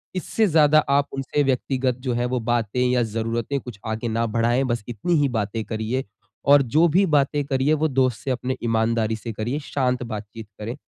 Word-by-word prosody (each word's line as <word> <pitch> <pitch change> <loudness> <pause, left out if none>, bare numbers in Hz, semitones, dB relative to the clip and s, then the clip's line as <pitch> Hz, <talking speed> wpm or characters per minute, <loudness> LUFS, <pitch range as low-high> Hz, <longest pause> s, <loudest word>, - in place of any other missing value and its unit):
इससे 210 +4 0
ज़्यादा 155 -2 +5
आप 140 +1 +3
उनसे 135 +2 -1
व्यक्तिगत 130 -1 0
जो 125 - +1
है 120 +1 0
वो 125 0 -1
बातें 120 0 -1
या 125 -1 +2
जरूरतें 115 +4 -2
कुछ 120 -6 -10
आगे 110 +2 -3
ना 115 +1 0
बढ़ाएँ, 115 +3 +1
बस 120 -4 -2
इतनी 120 - -2
ही 140 - +2
बातें 110 -2 -2
करिए 110 +4 -2 0.4
और 140 0 +7
जो 150 +7 +3
भी 185 +5 +3
बातें 145 +1 +2
करिए 140 +2 +1
वो 155 +1 +1
दोस्त 130 -4 +1
से 135 - -1
अपनी 130 +1 -2
ईमानदारी 115 -1 +1
से 115 +1 -6
करिए, 120 +8 -3
शांत 125 -3 -1
बातचीत 110 -1 -7
करें। 115 +3 -5
125 Hz, 195 wpm, -23 LUFS, 115-140 Hz, 0.4 s, और